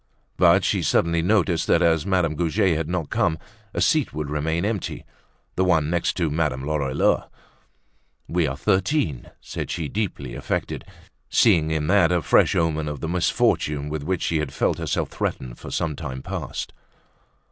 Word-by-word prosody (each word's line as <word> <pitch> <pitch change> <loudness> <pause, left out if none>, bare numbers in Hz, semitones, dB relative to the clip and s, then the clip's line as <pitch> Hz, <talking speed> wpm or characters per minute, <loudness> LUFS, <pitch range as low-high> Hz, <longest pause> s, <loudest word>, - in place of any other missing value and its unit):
But - - +5
she - - +1
suddenly 85 0 +2
noticed 90 -2 +1
that, 85 - +4
as 80 +1 +2
Madame 90 -5 +2
Goujet 85 +2 +1
had 80 0 -2
not 85 -5 -2
come, 80 - +1 0.3
a - - -4
seat 155 - +2
would 75 -2 -3
remain 80 +4 -1
empty—the 105 -2 -5
one 80 -4 +2
next 85 -1 +1
to 85 -4 0
Madame 75 -4 -1
Lorilleux. 70 -3 +1 1.0
"We 85 -2 +1
are 70 0 -3
thirteen!" 95 - 0
said - - -5
she, 80 -4 -3
deeply 90 - -3
affected, - - -3 0.4
seeing 80 -2 +4
in 80 -1 -1
that 90 0 +4
a 90 -3 +1
fresh 70 - +4
omen 80 -2 0
of 75 -2 -4
the 80 - -4
misfortune 75 -4 +1
with 75 0 -3
which 90 +2 -1
she 80 - 0
had 75 -3 -3
felt - - 0
herself - - -1
threatened - - -4
for - - -8
some 80 -3 -2
time 65 -1 -6
past. - - -5
80 Hz, 165 wpm, -23 LUFS, 75-90 Hz, 1.0 s, But